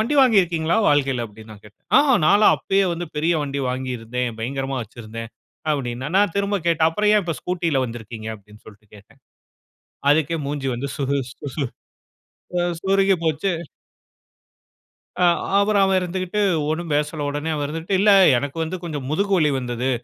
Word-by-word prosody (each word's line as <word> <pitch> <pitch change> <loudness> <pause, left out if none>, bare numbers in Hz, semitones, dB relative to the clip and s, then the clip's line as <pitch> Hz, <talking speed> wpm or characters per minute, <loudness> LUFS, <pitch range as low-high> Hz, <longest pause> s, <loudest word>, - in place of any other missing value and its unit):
வண்டி 235 +7 0
வாங்கிருக்கீங்களா, 175 -9 +3
வாழ்க்கைல?" 135 -4 +2
அப்பிடீன்னு 110 +1 -13
நான் 105 0 -16
கேட்டேன். 105 - -22
"ஆ - - +7 0.3
நான்லாம் 205 +6 +6
அப்பயே 195 0 +1
வந்து 175 +1 -5
பெரிய 160 +3 +2
வண்டி 140 0 -3
வாங்கியிருந்தேன். 125 -2 -3
பயங்கரமா 135 +2 -3
வைச்சிருந்தேன்." 115 0 -9 0.4
அப்பிடீன்னான். 135 +2 -3
நான் 205 -3 +3
திரும்ப 200 0 +1
கேட்டேன். 165 -1 +3
"அப்புறம் 210 +5 +1
ஏன் 210 - +3
இப்போ, 165 - -2
ஸ்கூட்டில 170 -6 -1
வந்திருக்கீங்க?" 110 -1 -8
அப்பிடீன்னு 105 0 -17
சொல்லிட்டு 105 0 -16
கேட்டேன். 100 - -20 0.9
அதுக்கே 155 +2 +2
மூஞ்சி 140 -2 -3
வந்து 130 +4 -4
சுரு 140 0 -1 0.2
சு 140 +1 -5 0.9
ஆ - - +2 0.2
சுருங்கி 195 0 +3
போச்சு. 160 +4 0 1.7
ஆ. - - +6 0.3
அப்புறம் 200 0 +3
அவன் 190 -1 +2
இருந்துகிட்டு 185 +3 -2 0.3
ஒண்ணும் 165 0 -3
பேசல. 150 0 -1
உடனே 145 +2 -3
அவன் 145 -1 -2
இருந்துக்கிட்டு, 165 +6 -2
"இல்ல, 205 +1 +5 0.3
எனக்கு 140 +4 -4
வந்து 180 +4 -4
கொஞ்சம் 150 -6 -5
முதுகு 200 +5 0
வலி 150 -4 +3
வந்தது, 125 0 -2
150 Hz, 155 wpm, -22 LUFS, 125-180 Hz, 1.7 s, ஆ